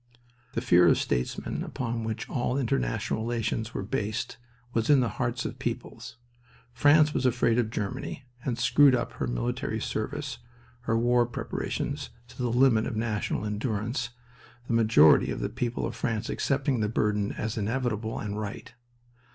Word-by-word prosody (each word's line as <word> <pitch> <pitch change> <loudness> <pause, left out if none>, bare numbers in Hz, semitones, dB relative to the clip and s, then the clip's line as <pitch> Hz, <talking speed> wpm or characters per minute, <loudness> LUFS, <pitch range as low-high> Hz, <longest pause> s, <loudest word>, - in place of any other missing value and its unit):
The - - -1
fear 90 0 +5
of - - +5
statesmen, 60 - -2
upon 115 -2 -3
which 110 +1 -4
all 125 +1 -1
international 70 - 0
relations 115 -1 -2
were - - -2
based, 115 +2 -3 0.4
was 115 +2 0
in 145 -2 +7
the 115 -5 -1
hearts 120 +1 -1
of 130 - -5
peoples. 120 0 -5 0.6
France 150 +5 +5
was - - 0
afraid 120 -2 +2
of 115 -3 +1
Germany 125 +5 -4 0.2
and 120 -3 -1
screwed 135 +3 +5
up 120 - -2
her - - -3
military - - -2
service, - - -3 0.5
her 115 - +2
war 120 0 +3
preparations, 120 - -3 0.2
to - - -15
the 125 -1 0
limit 120 -2 +4
of - - -4
national 110 -1 -1
endurance, 110 +3 -2 0.6
the 120 - -2
majority 110 -9 +6
of - - -3
the - - -2
people 120 0 -2
of 115 - -4
France 115 -2 -2
accepting 135 -2 0
the 105 -1 +1
burden 105 -2 0
as 110 0 -3
inevitable 110 0 -1
and 105 -1 -3
right. 105 +2 -6
115 Hz, 160 wpm, -28 LUFS, 110-125 Hz, 0.6 s, in